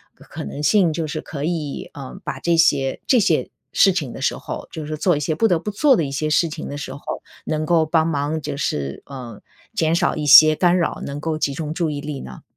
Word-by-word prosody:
可 - - -18
可 - - -7
能 105 - -6
性 180 0 +3
就 160 0 -3
是 155 +1 -4
可 145 -1 -5
以， 160 -4 -3
呃， 140 +6 -9
把 150 - -5
这 170 -1 +2
些 140 -5 +2
这 255 - +5
些 - - +1 0.2
事 195 - +5
情 150 -9 -3
的 - - -8
时 - - 0
候， - - -7
就 155 -2 -6
是 155 - -4
做 170 -1 +2
一 - - -2
些 150 +2 -1
不 225 +9 +2
得 175 - +3
不 210 - -4
做 270 +6 +4
的 165 - +1
一 135 - -5
些 155 +2 -1
事 165 +2 +3
情 155 +1 -6
的 145 - -5
时 135 -1 -6
候， 140 - -10 0.4
能 155 0 -1
够 165 -1 +3
帮 160 0 +2
忙 150 0 -1
就 145 -1 -4
是， 70 - -3
呃， 125 -6 -9 0.3
减 165 -6 +1
少 - - +1
一 150 - -3
些 155 +2 +9
干 180 +1 +3
扰， 170 - -1
能 140 +1 -5
够 155 0 -2
集 140 -2 0
中 155 0 -4
注 165 -1 -1
意 145 -1 -4
力 145 -2 -5
呢？ - - -10
155 Hz, 270 characters per minute, -21 LUFS, 145-170 Hz, 0.4 s, 些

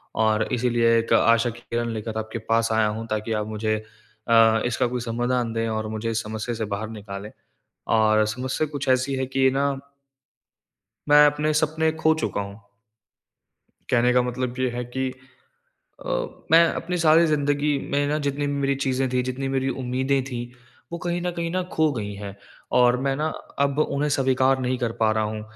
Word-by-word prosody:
और 110 0 +2
इसलिए 115 -1 +2
एक 115 - -1
आशा 115 +1 +4
की 115 +1 -9
किरण 120 0 -1
लेकर 110 0 -5
आपके 110 +1 -5
पास 115 0 +2
आया 110 -1 +3
हूँ 110 +2 -4
ताकि 110 +1 -3
आप 105 - -3
मुझे 110 0 -1 0.5
अ, 115 -1 +5
इसका 125 +1 0
कोई 125 +1 -3
समाधान 120 0 -1
दें 115 0 -1
और 110 0 -2
मुझे 110 +1 -3
इस 115 +1 -1
समस्या 110 +2 -4
से 110 -1 -3
बाहर 110 +2 -5
निकालें 105 -1 -8 0.7
और 110 0 +4
समस्या 130 +7 -2
कुछ 145 -1 -4
ऐसी 130 +1 +2
है 130 - -1
कि 130 0 +2
ना 140 +1 +1 1.4
मैं 150 0 +8
अपने 150 +1 +1
सपने 160 +1 +1
खो 160 0 +5
चुका - - -1
हूँ। 100 +1 -8 1.3
कहने 125 0 +3
का 125 - +4
मतलब 125 +1 -3
ये 130 -1 +1
है 120 0 -4
कि 130 0 -1 0.9
अ, - - -4 0.4
मैं 165 +1 +8
अपनी 180 +1 -3
सारी 165 0 +5
ज़िंदगी 145 -1 +1
में 145 +1 +1
ना 150 +1 0
जितनी 145 0 -2
भी 145 - -2
मेरी 140 -1 0
चीज़ें 135 -1 0
थी, 125 0 +1
जितनी 130 +2 -3
मेरी 135 0 0
उम्मीदें 130 +2 0
थी 125 -3 -5 0.5
वो 170 - -3
कहीं 175 0 -1
न 180 0 -1
कहीं 170 -1 -3
न 185 - +1
खो 155 -1 +2
गई 105 -4 -4
हैं 100 -1 -8 0.4
और 125 0 +5
मैं 135 0 0
ना 155 +3 -1 0.4
अब 140 +1 -2
उन्हें 150 -1 0
स्वीकार 130 0 +2
नहीं 125 0 -1
कर 120 -3 -1
पा 110 -1 +4
रहा 110 - +2
हूँ। 105 0 -4
125 Hz, 190 wpm, -24 LUFS, 115-140 Hz, 1.4 s, मैं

